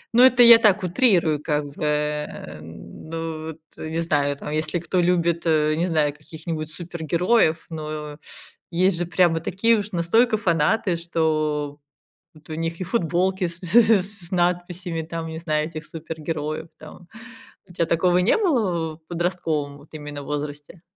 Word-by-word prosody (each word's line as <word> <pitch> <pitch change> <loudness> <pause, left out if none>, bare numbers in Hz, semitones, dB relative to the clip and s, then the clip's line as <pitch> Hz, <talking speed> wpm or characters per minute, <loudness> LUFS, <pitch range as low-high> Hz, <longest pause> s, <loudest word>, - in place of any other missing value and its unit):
Ну 240 - +7
это 255 -1 +7
я 235 -1 +10
так, 210 -3 +3
утрирую 175 - +3
как 150 -1 -1
бы, - - -6
э. 150 - -2
Ну 155 - -7
вот, 160 0 -8 0.2
не 160 +1 -3
знаю 145 -3 0
там, 150 - -7
если 155 +3 -1
кто 175 +2 0
любит, 170 -1 +1
э, 155 -1 +3
не 170 +3 0
знаю 155 -4 +1
каких-нибудь 155 +1 -6
супергероев. 170 +2 0
Но, 155 -2 -6 0.5
есть 180 +1 +2
же 175 - -1
прямо 175 -2 +3
такие 210 +7 +2
уж 205 0 -4
настолько 220 +7 +2
фанаты, 175 0 +1
что 155 -3 -1 0.6
вот 155 0 -19
у - - -3
них 165 +2 -3
и - - -2
футболки 185 -1 0
с 170 0 -9
с 205 +1 +3
с - - -19
надписями 175 -1 -1
там, 165 +1 -5
не 160 0 -6
знаю, 155 -2 0
этих 155 -2 -8
супергероев, 160 -1 -5
там. 160 +2 -13 0.6
У - - -13
тя 170 - +1
такого 175 +2 +2
не 180 +4 +3
было 190 - 0
в 160 0 -32
подростковом 165 -5 -2
вот 145 +1 -17
именно 145 -2 -7
возрасте? 150 +3 -6
165 Hz, 160 wpm, -23 LUFS, 155-180 Hz, 0.6 s, я